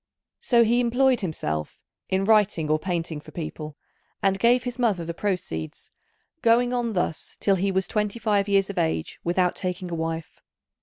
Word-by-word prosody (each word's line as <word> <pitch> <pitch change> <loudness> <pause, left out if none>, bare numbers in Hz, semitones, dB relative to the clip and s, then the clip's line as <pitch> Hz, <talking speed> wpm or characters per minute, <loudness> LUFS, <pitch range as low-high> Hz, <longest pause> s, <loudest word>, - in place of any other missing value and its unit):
So 240 - +4
he 235 +2 +3
employed 245 +1 +3
himself 80 - -4 0.3
in 190 +1 +1
writing 205 -8 +3
or 155 - +3
painting 165 -3 -3
for - - -14
people, 155 -2 -6 0.5
and 195 0 +2
gave 245 +4 +4
his 245 0 -5
mother 205 -9 +1
the 170 - -4
proceeds, 170 - -4 0.5
going 240 +2 +3
on 240 -2 -1
thus 175 -4 -2
till 195 -1 +2
he 195 +2 0
was 190 0 0
twenty 210 0 -1
five 210 -3 +1
years 195 0 +2
of - - -3
age 80 0 -1
without 180 +1 +1
taking 180 -1 -4
a - - -3
wife. 165 -1 -4
190 Hz, 170 wpm, -25 LUFS, 165-230 Hz, 0.5 s, So